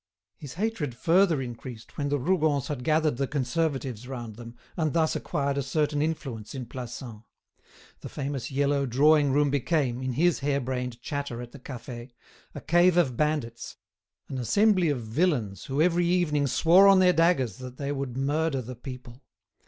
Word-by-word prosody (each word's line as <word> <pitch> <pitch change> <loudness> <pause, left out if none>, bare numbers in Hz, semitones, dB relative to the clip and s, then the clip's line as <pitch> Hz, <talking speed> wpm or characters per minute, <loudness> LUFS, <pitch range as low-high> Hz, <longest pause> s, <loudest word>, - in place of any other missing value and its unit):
His 140 +4 -10
hatred 185 - -2
further 165 0 +3
increased 120 -1 -9
when 145 -1 -2
the 145 - +1
Rougons 150 -2 +1
had 140 -4 -4
gathered 155 -2 +2
the 135 0 -1
Conservatives 135 -4 -2
round 120 -5 -6
them, 115 0 -10 0.2
and 155 -4 0
thus 160 -1 +2
acquired 140 -1 -1
a - - +1
certain 145 +2 0
influence 135 -8 -4
in 130 -2 -5
Plassans. 120 -2 -8 0.8
The - - -8
famous 140 -3 -4
yellow 140 0 +1
drawing 145 +3 +4
room 145 +1 +2
became, 140 -3 0
in 130 -1 -2
his 170 +6 +2
hare 140 0 0
brained 125 -2 -4
chatter 140 -5 -4
at 120 -1 -8
the 140 - -12
cafe, 120 -1 -9 0.4
a - - -6
cave 175 +1 +4
of 140 -9 +2
bandits, 145 -5 -2 0.5
an 130 - -5
assembly 190 - +3
of 140 -4 -1
villains 110 - -1
who 140 +3 +1
every 175 0 +2
evening 160 -5 +1
swore 175 +8 +5
on 195 -1 +7
their 180 -1 +5
daggers 165 - +2
that 125 0 -9
they 140 0 -3
would 135 -3 -4
murder 145 0 0
the 125 +2 -8
people. 125 0 -10
140 Hz, 170 wpm, -27 LUFS, 125-160 Hz, 0.8 s, on